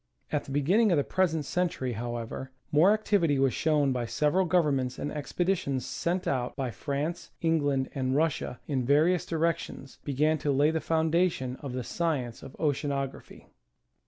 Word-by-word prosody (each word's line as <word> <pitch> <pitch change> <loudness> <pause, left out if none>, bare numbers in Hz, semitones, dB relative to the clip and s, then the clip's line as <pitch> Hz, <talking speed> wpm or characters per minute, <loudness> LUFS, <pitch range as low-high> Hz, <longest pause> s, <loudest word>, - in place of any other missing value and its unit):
At - - -1
the - - -8
beginning 185 +11 +3
of 170 - +4
the 145 - +3
present 165 -4 0
century, 170 -7 -1
however, 120 +2 -5 0.2
more 155 +6 +6
activ 210 -3 +1
ity 145 -4 +3
was 135 -1 +2
shown 150 -3 +2
by 125 -2 -1
several 150 +9 +2
governments, 145 -7 +1
and 145 - -3
expeditions 150 -3 -1
sent 180 +2 -2
out 125 -2 -1
by 130 -3 -2
France, 150 +7 -3
England 145 -5 +1
and 130 -1 -1
Russia, 155 -5 0
in 135 -4 -1
various 155 +7 +3
directions, 165 -4 -2
began 150 +3 +1
to 145 - 0
lay 145 +3 +3
the 160 0 -1
foundation 160 -5 +1
of 140 -3 -7
the 130 -1 -3
science 135 -7 -2
of - - -10
Oceanography. 140 -2 -3
145 Hz, 160 wpm, -28 LUFS, 135-165 Hz, 0.2 s, more